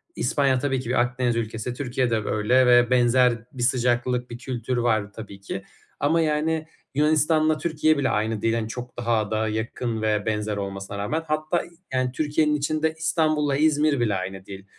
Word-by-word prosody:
İspanya 135 Hz, -3 st, +1 dB
tabii 135 Hz, -2 st, 0 dB
ki 125 Hz, -, -6 dB
bir 125 Hz, -, +2 dB
Akdeniz 120 Hz, -1 st, 0 dB
ülkesi, 115 Hz, +1 st, -3 dB
Türkiye 125 Hz, -1 st, -1 dB
de 115 Hz, -, +1 dB
öyle 125 Hz, +5 st, +3 dB
ve 120 Hz, 0 st, +5 dB
benzer 125 Hz, 0 st, +4 dB, 0.2 s
bir 125 Hz, -2 st, -3 dB
sıcaklık 125 Hz, 0 st, +1 dB
bir 120 Hz, -, -7 dB
kültür 125 Hz, -1 st, -3 dB
var 110 Hz, -4 st, 0 dB
tabii 100 Hz, -3 st, -10 dB
ki 95 Hz, 0 st, -6 dB, 0.4 s
ama, 160 Hz, +4 st, +2 dB
yani, 155 Hz, +1 st, 0 dB, 0.3 s
Yunanistan'la 155 Hz, +1 st, +3 dB
Türkiye 155 Hz, -1 st, +1 dB
bile 135 Hz, -2 st, +1 dB
aynı 110 Hz, 0 st, -1 dB
değil, 115 Hz, 0 st, +1 dB
hani, 115 Hz, -1 st, -1 dB
çok 125 Hz, +1 st, -8 dB
daha 115 Hz, -3 st, 0 dB
da 110 Hz, 0 st, 0 dB
yakın 110 Hz, +1 st, -3 dB
ve 105 Hz, -1 st, 0 dB
benzer 105 Hz, -1 st, -1 dB
olmasına 100 Hz, 0 st, -5 dB
rağmen. 150 Hz, +11 st, -2 dB
Hatta 155 Hz, +3 st, 0 dB
i -, -, -15 dB, 0.2 s
yani, 130 Hz, -1 st, 0 dB
Türkiye'nin 150 Hz, +2 st, +1 dB
içinde 155 Hz, +2 st, 0 dB
İstanbul'la 155 Hz, -3 st, +1 dB
İzmir 150 Hz, -2 st, +2 dB
bile 110 Hz, -4 st, +1 dB
aynı 95 Hz, +1 st, -5 dB
değil. 95 Hz, 0 st, -10 dB
125 Hz, 180 wpm, -24 LUFS, 110-150 Hz, 0.4 s, ve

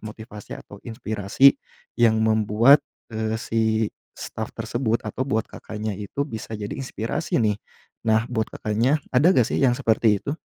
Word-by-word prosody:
motivasi 110 Hz, -1 st, -9 dB
atau 100 Hz, -, -13 dB
inspirasi 110 Hz, +2 st, +3 dB, 0.4 s
yang 115 Hz, -2 st, +5 dB
membuat, 110 Hz, +5 st, +5 dB, 0.3 s
eee, 110 Hz, 0 st, -1 dB
si 115 Hz, 0 st, -1 dB, 0.5 s
staf -, -, -5 dB
tersebut 120 Hz, -2 st, -1 dB
atau 110 Hz, +4 st, -3 dB
buat 110 Hz, -3 st, +1 dB
Kakaknya 110 Hz, 0 st, -5 dB
itu 105 Hz, +7 st, -3 dB
bisa 110 Hz, -5 st, -7 dB
jadi 105 Hz, -1 st, -5 dB
inspirasi 125 Hz, -4 st, -3 dB
nih. 105 Hz, -2 st, +1 dB, 0.5 s
Nah 110 Hz, +1 st, +3 dB
buat 110 Hz, -2 st, 0 dB
Kakaknya 115 Hz, +7 st, 0 dB, 0.2 s
ada 135 Hz, +6 st, +5 dB
gak 125 Hz, -, +5 dB
sih -, -, 0 dB
yang 125 Hz, -3 st, +3 dB
seperti 110 Hz, -3 st, +2 dB
itu? 140 Hz, -, -2 dB
110 Hz, 150 wpm, -23 LUFS, 110-120 Hz, 0.5 s, yang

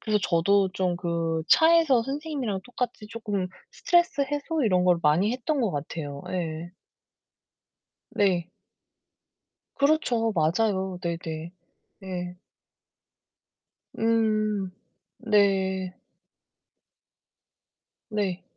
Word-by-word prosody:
그래서 215 Hz, -2 st, +1 dB
저도 190 Hz, +3 st, +3 dB
좀 180 Hz, -2 st, 0 dB
그 165 Hz, -2 st, -1 dB
차에서 320 Hz, -7 st, +5 dB
선생님이랑 275 Hz, -7 st, -3 dB
똑같이 245 Hz, -3 st, -4 dB
쪼끔 210 Hz, -4 st, -3 dB, 0.2 s
스트레스 345 Hz, -4 st, +2 dB
해소 290 Hz, +1 st, -2 dB
이런 185 Hz, -4 st, +3 dB
걸 180 Hz, -1 st, +4 dB
많이 170 Hz, +8 st, +3 dB
했던 270 Hz, +3 st, -1 dB
것 225 Hz, -, +1 dB
같아요. 145 Hz, -1 st, -5 dB
예. 170 Hz, -1 st, -4 dB, 1.4 s
네. 180 Hz, -4 st, +1 dB, 1.3 s
그렇죠. 255 Hz, -6 st, +2 dB
맞아요. 190 Hz, +3 st, +1 dB
네네. 165 Hz, -1 st, -4 dB, 0.5 s
네. 180 Hz, -1 st, -5 dB, 1.6 s
음 215 Hz, -3 st, +1 dB, 0.5 s
네. 190 Hz, -4 st, +1 dB, 2.2 s
네. 195 Hz, -3 st, -2 dB
195 Hz, 165 characters per minute, -26 LUFS, 175-230 Hz, 2.2 s, 차에서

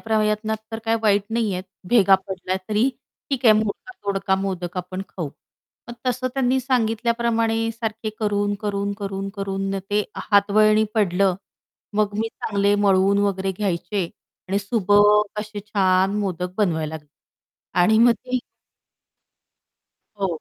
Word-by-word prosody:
प्रयत्नात 215 Hz, 0 st, 0 dB, 0.2 s
तर 225 Hz, -, -3 dB
काय 225 Hz, 0 st, +2 dB
वाईट 205 Hz, -2 st, +3 dB
नाही 225 Hz, -2 st, 0 dB
आहेत, 180 Hz, +1 st, -4 dB, 0.2 s
भेगा 200 Hz, -4 st, +6 dB
पडल्या 185 Hz, 0 st, -3 dB
तरी 215 Hz, +4 st, +2 dB, 0.4 s
ठीक 265 Hz, -2 st, -1 dB
आहे, 220 Hz, -, +8 dB
मोडका-तोडका 200 Hz, -, -2 dB
मोदक 185 Hz, -2 st, -4 dB
आपण 185 Hz, +1 st, -4 dB
खाऊ." 165 Hz, -6 st, -5 dB, 0.6 s
मग 240 Hz, -, -6 dB
तसं 255 Hz, +1 st, 0 dB
त्यांनी 265 Hz, -1 st, +2 dB
सांगितल्याप्रमाणे 230 Hz, -2 st, +1 dB
सारखे 220 Hz, -1 st, -4 dB
करून 205 Hz, -2 st, 0 dB
,करून, 200 Hz, -1 st, -2 dB
करून, 195 Hz, 0 st, -3 dB
करून 195 Hz, 0 st, -2 dB
न, 195 Hz, -, -1 dB
ते 205 Hz, 0 st, +2 dB, 0.3 s
हातवळणी 215 Hz, +1 st, +4 dB
पडलं. 195 Hz, -3 st, +2 dB, 0.6 s
मग 210 Hz, -1 st, +1 dB
मी 225 Hz, +1 st, 0 dB
चांगले 200 Hz, -2 st, 0 dB
मळवून 195 Hz, +1 st, +4 dB
वगैरे 195 Hz, -1 st, 0 dB
घ्यायचे 195 Hz, +1 st, -2 dB, 0.5 s
आणि 195 Hz, +2 st, +1 dB
सुबक 205 Hz, 0 st, +3 dB
असे 210 Hz, -1 st, -6 dB
छान 190 Hz, -1 st, +2 dB
मोदक 180 Hz, -3 st, -3 dB
बनवायला 160 Hz, -6 st, 0 dB
लागले. 150 Hz, -2 st, -9 dB, 0.7 s
आणि 220 Hz, +5 st, +5 dB
मग 235 Hz, +1 st, +7 dB
ते 255 Hz, +3 st, -3 dB, 1.8 s
हो. 195 Hz, -, +2 dB
205 Hz, 130 wpm, -22 LUFS, 195-220 Hz, 1.8 s, आहे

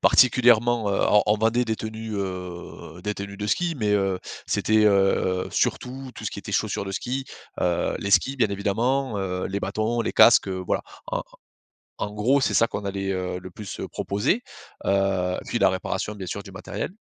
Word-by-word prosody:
particulièrement, 120 Hz, -2 st, +5 dB
heu, 100 Hz, -, +1 dB
on 105 Hz, -, +6 dB
on 105 Hz, +1 st, +4 dB
vendait 115 Hz, +3 st, +2 dB
des 110 Hz, -1 st, 0 dB
tenues, 110 Hz, 0 st, -5 dB
heu, 90 Hz, -3 st, -6 dB
des 105 Hz, 0 st, -1 dB
tenues 100 Hz, 0 st, -7 dB
de 105 Hz, -, -4 dB
ski. 170 Hz, -, 0 dB
Mais, 105 Hz, -2 st, +1 dB
heu, 95 Hz, -2 st, +1 dB, 0.3 s
c'était, 110 Hz, 0 st, +2 dB
heu, 95 Hz, -2 st, +2 dB
surtout, 130 Hz, +1 st, -1 dB
tout -, -, -9 dB
ce -, -, -1 dB
qui -, -, -6 dB
était -, -, -8 dB
chaussures -, -, 0 dB
de -, -, -4 dB
ski, 130 Hz, +6 st, -3 dB, 0.3 s
heu, 85 Hz, -1 st, +1 dB
les 100 Hz, -, -3 dB
skis, 135 Hz, +6 st, +3 dB
bien 115 Hz, -5 st, +3 dB
évidemment, 110 Hz, +5 st, 0 dB
heu, 90 Hz, -1 st, -2 dB
les 100 Hz, +1 st, -3 dB
bâtons, 110 Hz, +4 st, -1 dB
les 115 Hz, -, -1 dB
casques, -, -, +7 dB
heu, 95 Hz, -1 st, -3 dB
voilà. -, -, 0 dB, 0.2 s
En -, -, -2 dB, 0.8 s
en 105 Hz, -, -2 dB
gros, 120 Hz, +7 st, +2 dB
c'est -, -, +1 dB
ça 115 Hz, -, +5 dB
qu'on 100 Hz, -, -5 dB
allait, 95 Hz, 0 st, -2 dB
heu, 90 Hz, -1 st, -2 dB
le 90 Hz, +1 st, -9 dB
plus, 100 Hz, +2 st, -8 dB
heu, -, -, -4 dB
proposer, 105 Hz, -, 0 dB, 0.4 s
heu, 95 Hz, -2 st, +1 dB
et -, -, -13 dB
puis -, -, -1 dB
la -, -, +5 dB
réparation, 105 Hz, -, -2 dB
bien 95 Hz, -3 st, -7 dB
sûr, 100 Hz, -, -4 dB
du 95 Hz, -, -11 dB
matériel. 95 Hz, -, -5 dB
105 Hz, 200 wpm, -25 LUFS, 95-115 Hz, 0.8 s, casques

